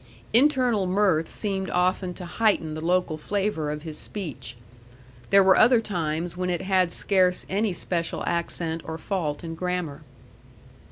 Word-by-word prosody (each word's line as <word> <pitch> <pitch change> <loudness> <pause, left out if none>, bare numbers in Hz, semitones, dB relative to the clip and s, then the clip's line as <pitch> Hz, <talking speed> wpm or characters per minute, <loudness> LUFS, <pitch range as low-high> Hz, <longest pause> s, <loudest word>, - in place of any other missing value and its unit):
Internal 250 -6 +3
mirth 180 -4 +2
seemed 195 -3 -3
often 180 +1 +1
to 180 - -7
heighten 180 -4 +1
the 155 - -5
local 175 -2 0
flavor 195 -3 -1
of 150 0 -5
his 155 -2 -7
speech. 150 - -7 0.7
There 195 0 +6
were 190 0 +6
other 240 +1 +6
times 170 -5 -3
when 180 0 -2
it 175 +1 -2
had 185 -2 +2
scarce 185 -2 +2
any 205 +2 +1
special 170 -1 -2
accent 165 -1 -2
or 160 0 -6
fault 160 -4 -3
in 165 -1 -5
grammar. 175 -3 -3
180 Hz, 150 wpm, -25 LUFS, 165-195 Hz, 0.7 s, There